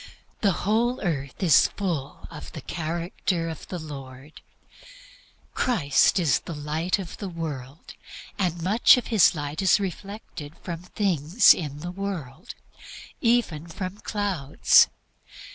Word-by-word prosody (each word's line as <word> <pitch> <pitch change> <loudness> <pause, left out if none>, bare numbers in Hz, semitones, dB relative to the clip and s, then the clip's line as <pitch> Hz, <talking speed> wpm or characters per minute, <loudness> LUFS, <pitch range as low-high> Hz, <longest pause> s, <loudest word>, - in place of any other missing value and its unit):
"The 200 -4 +3
whole 235 +4 +1
earth 145 -3 -3
is 165 -7 +6
full 170 -9 -4
of - - -10
the - - -7
character 170 +1 -3
of 160 - -8
the 180 - -5
Lord." 140 -2 -10 1.1
Christ 180 - +2
is 160 -9 +2
the 170 - -8
Light 155 +5 -1
of 185 -4 -7
the 200 - -5
world, 150 -5 -7 0.5
and 175 -3 -1
much 215 +8 +6
of 250 - -3
his 200 -4 +5
Light 145 +2 -4
is 190 +1 +4
reflected 195 -5 -7
from 170 -2 -5
things 180 - +4
in 145 -3 -6
the 175 +2 -5
world 180 - -6 0.7
even 230 - +1
from 185 +4 -6
clouds. 200 -11 +3
170 Hz, 125 wpm, -25 LUFS, 150-195 Hz, 1.1 s, is